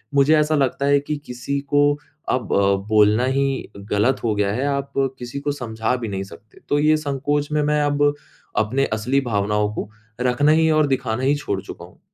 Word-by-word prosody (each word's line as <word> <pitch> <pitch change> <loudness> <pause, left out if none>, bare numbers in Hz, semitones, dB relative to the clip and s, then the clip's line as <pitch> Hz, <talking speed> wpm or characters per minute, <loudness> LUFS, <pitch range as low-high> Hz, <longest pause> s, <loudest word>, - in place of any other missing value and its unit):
मुझे 140 +3 +5
ऐसा 150 +1 +2
लगता 140 -1 0
है 140 0 +4
कि 145 +2 -4
किसी 125 +3 -3
को 145 +1 +2 0.5
अब 125 -5 -1
अ, 100 0 +3
बोलना 110 +2 +4
ही 135 -1 -1
गलत 105 +5 0
हो 115 -2 +1
गया 100 -1 +1
है, 130 +5 -1
आप 140 -1 -2 0.3
किसी 125 +3 -6
को 145 +1 -2
समझा 115 -4 -2
भी 120 -2 -4
नहीं 95 -2 -3
सकते। 100 +3 -15
तो 145 - +2
ये 155 +1 +4
संकोच 145 0 -2
में 150 0 +1
मैं 150 0 +1
अब 145 0 +2 0.4
अपने 125 +6 +1
असली 120 +6 +1
भावनाओं 105 -3 0
को 105 - -5 0.3
रखना 125 +4 +3
ही 160 +1 +4
और 155 -1 +3
दिखाना 130 -3 -1
ही 140 +2 +3
छोड़ 100 -10 -3
चूका 85 -2 -10
हूँ। 90 - -20
130 Hz, 200 wpm, -21 LUFS, 110-145 Hz, 0.5 s, मुझे